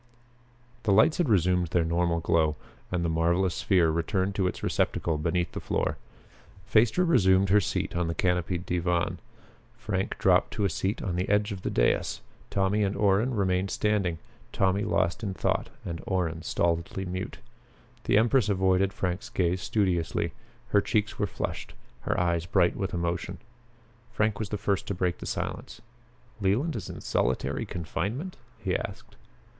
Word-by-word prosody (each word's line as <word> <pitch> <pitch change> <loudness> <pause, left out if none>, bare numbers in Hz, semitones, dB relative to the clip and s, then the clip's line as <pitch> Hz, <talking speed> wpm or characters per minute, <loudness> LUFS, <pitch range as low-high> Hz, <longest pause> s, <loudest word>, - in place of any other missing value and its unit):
The 110 -3 +1
lights 110 - +5
had 170 -7 +2
resumed 90 -3 +3
their 85 0 +1
normal 85 0 +1
glow, 80 -2 +2 0.4
and 90 -1 0
the - - +2
marvelous 85 +3 +1
sphere 90 -5 +3
returned 95 +4 0
to 95 -2 +1
its - - -4
receptacle 80 -3 0
beneath 85 +3 0
the - - -5
floor. - - -1 0.7
Phaestra 110 - +3
resumed 95 - +4
her 105 +2 +5
seat - - -2
on 85 -1 0
the 85 - -2
canopied 90 0 0
divan. 85 -1 0 0.6
Frank - - -2
dropped - - +3
to 105 - 0
a 95 - +1
seat 95 +6 -2
on 90 -3 -2
the 90 - -1
edge 105 +1 +2
of 95 -2 -5
the - - -2
dais. - - +1 0.3
Tommy 100 +2 +1
and 100 -1 0
Orrin 105 +5 +2
remained 95 -1 +1
standing, 100 -6 0 0.3
Tommy 95 +1 +1
lost 95 +2 0
in 100 -4 -3
thought - - 0 0.2
and 85 -1 -4
Orrin 85 -4 -1
stolidly 85 +3 -1
mute. 95 +5 -4 0.7
The - - +4
empress 115 0 +3
avoided 95 0 +2
Frank's 95 +6 -3
gaze 90 0 0
studiously. 85 -5 0 0.4
Her 100 - +4
cheeks 105 0 -1
were 105 - +1
flushed; - - -5 0.2
her - - -1
eyes 85 -1 0
bright 85 0 +3
with 95 -2 -3
emotion. 85 0 -2 0.7
Frank 110 -1 0
was 110 -3 -3
first 100 -2 -1
to 100 - -2
break 90 -1 -1
the - - -7
silence. - - -4 0.6
"Leland 110 - +1
is 100 -6 -5
in - - -7
solitary 65 - -1
confinement?" 100 - -3 0.2
he - - -2
asked. - - -6
95 Hz, 160 wpm, -28 LUFS, 85-105 Hz, 0.7 s, lights